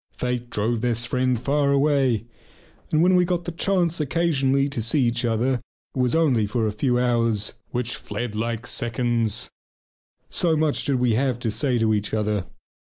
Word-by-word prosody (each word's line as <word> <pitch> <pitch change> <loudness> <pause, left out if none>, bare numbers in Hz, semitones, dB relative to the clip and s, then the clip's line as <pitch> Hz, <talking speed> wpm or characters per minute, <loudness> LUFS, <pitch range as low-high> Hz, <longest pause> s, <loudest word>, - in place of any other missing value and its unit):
Fate 125 -1 -2
drove 110 +1 -1
this 120 -1 0
one - - -9
friend 125 -2 +1
far 140 +2 +1
away, 135 -6 +2 0.7
and 155 +1 +3
when 185 +1 +4
we 180 - +5
got 175 -1 -1
the 175 - -3
chance 175 -1 0
occasionally 140 -3 +1
to 140 -5 -3
see 115 +6 +1
each 120 0 0
other 120 +2 0 0.3
it - - -3
was 125 +3 +2
only 130 -10 +3
for 115 +2 -1
a 105 - 0
few 125 +4 0
hours, 115 -4 +1 0.2
which 120 0 -2
fled 120 -3 -5
like 115 0 -3
seconds 115 -2 0 0.8
so 165 -3 +1
much 155 -1 +1
did 140 - +1
we 125 -2 +2
have 130 +1 +1
to 120 -2 -2
say 125 +3 0
to 110 -1 +2
each 105 +1 -1
other. 105 -4 -1
125 Hz, 180 wpm, -23 LUFS, 115-140 Hz, 0.8 s, we